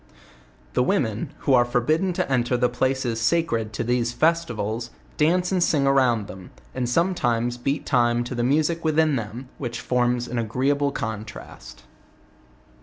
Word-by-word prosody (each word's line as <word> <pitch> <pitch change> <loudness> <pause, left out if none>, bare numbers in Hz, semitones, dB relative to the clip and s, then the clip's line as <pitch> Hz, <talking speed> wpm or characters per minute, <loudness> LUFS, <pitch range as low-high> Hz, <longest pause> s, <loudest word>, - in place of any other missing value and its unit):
The - - +2
women, 115 -4 0
who 140 - +2
are 120 -1 +6
forbidden 135 +10 +1
to - - -1
enter 125 -1 +1
the 125 0 +2
places 125 -2 -1
eacred 120 -11 0
to - - -2
these 120 0 0
festivals, 120 -7 0 0.3
dance 180 +4 +2
and 185 -2 +1
sing 145 -5 +2
around 130 -6 +3
them, 95 -2 -10 0.2
and 125 -1 -2
some 170 +9 +2
times 120 -6 0
beat 135 +4 -2
time 120 -2 +2
to 120 - -6
the 120 -1 -1
music 155 +6 +1
within 155 -1 +2
them; 115 +2 -5
which 120 -3 -4
forms 125 -1 0
an 125 - -3
agreeable 135 +5 0
contrast. 110 - -7
125 Hz, 155 wpm, -24 LUFS, 120-145 Hz, 0.3 s, are